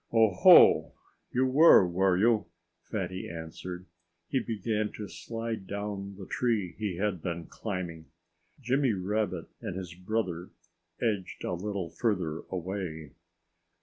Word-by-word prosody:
"Oh, 110 -3 +4
ho! 90 - +7 0.4
You 130 +1 +2
were, 130 - +7
were 90 +1 +2
you?" 110 -1 +3 0.4
Fatty 95 -3 -3
answered. 85 +2 -7 0.4
He 135 - +1
began 110 -2 -2
to 105 - -6
slide 115 -3 -5
down 100 -1 -5
the 95 - -8
tree 110 -5 0
he 105 -5 -2
had 95 -2 -1
been 85 -1 -4
climbing. 90 -6 -5 0.5
Jimmy 130 -1 +1
Rabbit 95 -2 -1 0.2
and 90 - -5
his 90 -2 -6
brother 90 -2 -3 0.5
edged 105 -6 -2
a - - -2
little 95 -1 -3
further 85 -5 -1
away. 90 -5 -4
95 Hz, 125 wpm, -29 LUFS, 90-110 Hz, 0.5 s, ho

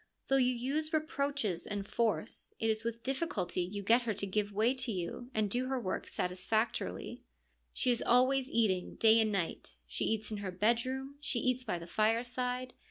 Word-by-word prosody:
Though 270 - +5
you 255 -1 +4
use 290 +6 -1
re 315 - +5
proaches 280 - -2
and 205 -1 -3
force, 225 -1 -1
it 225 0 +2
is 220 0 -2
with 230 0 -4
difficulty 265 - -1
you 200 +3 -4
get 230 +5 +5
her 225 -3 -2
to 200 - -2
give 205 +1 -1
way 220 +5 +2
to 255 -2 -1
you 190 +6 -4
and 215 -1 +2
do 245 +5 0
her 265 0 -1
work 185 -6 -3
satisfactorily. 180 - -2 0.5
She 250 - +1
is 240 - +1
always 255 +2 +3
eating, 195 -8 +1
day 225 0 +6
and 215 -1 +1
night; 170 - -2
she - - -2
eats 220 0 -1
in 215 - -2
her 200 -2 -4
bedroom, 255 +8 0
she 280 - +1
eats 255 +1 +1
by 210 -7 -2
the 170 - -8
fireside. 245 +5 0
230 Hz, 190 wpm, -33 LUFS, 205-255 Hz, 0.5 s, day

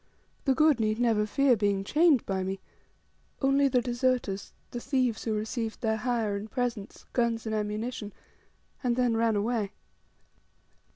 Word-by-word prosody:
The 270 -2 +3
good 305 -3 +4
need 215 -1 +1
never 225 -3 +2
fear 270 +3 +3
being 200 -2 +1
chained 300 - +4
by 190 -1 -1
me 190 +1 -3 0.8
only 275 +1 +3
the 250 -2 +2
deserters, 240 -5 -1 0.2
the 240 - -4
thieves, 255 -3 0
who 225 - 0
received 220 +2 -3
their 220 -2 +1
hire 225 -3 0
and 205 +2 -5
presents, 240 -5 -3
guns 235 -2 0
and 220 - -2
ammunition, 210 +1 -3 0.7
and 245 -2 +2
then 245 -2 +2
ran 225 -1 +2
away. 210 -1 -1
230 Hz, 150 wpm, -28 LUFS, 210-250 Hz, 0.8 s, good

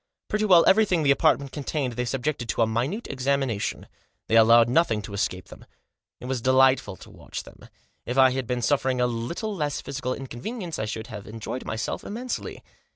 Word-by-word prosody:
Pretty 215 0 0
well 180 -5 +6
everything 190 -5 +4
the 140 - +4
apartment 140 0 +2
contained 140 -3 -3
they 125 +1 -2
subjected 130 -1 -2
to 115 - +2
a - - +4
minute 125 - -2
examination. 130 -4 -1 0.4
They 115 - +3
allowed 115 +1 +7
nothing 120 -5 +2
to 100 - -8
escape 95 -3 -3
them. - - -13 0.6
It - - -10
was 130 -1 -2
delightful 130 -4 +3
to - - -14
watch - - -8
them. - - -15 0.4
If 125 - -3
I 130 -1 +6
had 130 -2 -3
been 125 -1 -2
suffering 130 -1 +1
a 125 - +3
little 125 - -3
less 150 -5 -2
physical 130 -2 -4
inconvenience 165 - -6
I - - -1
should 110 0 -5
have 105 -2 -8
enjoyed 115 +3 -6
myself 110 0 -3
immensely. 240 +4 -5
130 Hz, 185 wpm, -25 LUFS, 115-150 Hz, 0.6 s, allowed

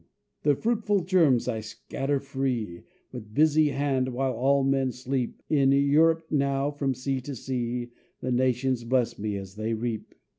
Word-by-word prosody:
"The 145 -1 +3
fruitful 215 - +1
germs 165 -10 +3
I 115 -3 -1
scatter 135 +6 -3
free, 130 -9 -3 0.3
With 110 -4 -9
busy 155 0 +4
hand, 135 -2 0
while 130 0 0
all 135 +4 +2
men 135 -1 +1
sleep; 125 0 -3
In 135 -3 +3
Europe 155 +4 +4
now, 140 -1 +1
from 140 -2 -1
sea 130 +1 -2
to 140 +2 -6
sea, 120 -1 -3 0.3
The 130 - -3
nations 125 0 +1
bless 120 -1 0
me 105 -1 -2
as 95 +1 -9
they 110 +1 -1
reap." 115 -1 -4
135 Hz, 155 wpm, -27 LUFS, 120-140 Hz, 0.3 s, busy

